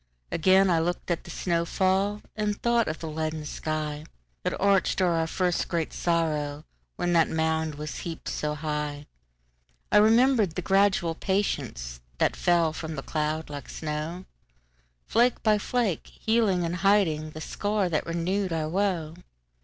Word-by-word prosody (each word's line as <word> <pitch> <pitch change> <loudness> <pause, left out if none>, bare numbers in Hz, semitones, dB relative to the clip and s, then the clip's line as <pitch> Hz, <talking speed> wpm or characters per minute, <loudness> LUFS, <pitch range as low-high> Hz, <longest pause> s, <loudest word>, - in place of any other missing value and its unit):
Again 190 +3 +4
I 165 - +3
looked 175 +2 -2
at 170 - -2
the - - -10
snow 170 0 0
fall, 195 +4 +1
And 210 -1 -1
thought 235 -1 +2
of 155 - -2
the 165 - -6
leaden 155 0 -3
skyThat 150 - -5
arched 195 -2 +3
o'er 180 -2 +3
our 165 -1 +1
first 180 +1 0
great 165 -2 -2
sorrow, 155 -4 0 0.3
When 175 0 0
that 165 -1 +4
mound 160 -1 0
was 150 +1 -6
heaped 165 -2 -6
so 150 0 -2
high.I 60 - -5
remembered 220 -3 +4
the 180 - -3
gradual 195 -3 +3
patienceThat - - -2
fell 170 -3 +2
from 160 0 -5
that 135 - -6
cloud 155 0 -2
like 145 -2 -7
snow, 155 +4 -4 0.8
Flake 240 +1 +2
by 215 -1 +4
flake, 225 -5 -1
healing 220 -5 +1
and 170 +2 -2
hidingThe 160 -6 +2
scar 205 +1 -1
that 160 -2 -1
renewed 180 +3 -1
our 155 -1 -1
woe. 175 -4 0
165 Hz, 145 wpm, -27 LUFS, 155-195 Hz, 0.8 s, Again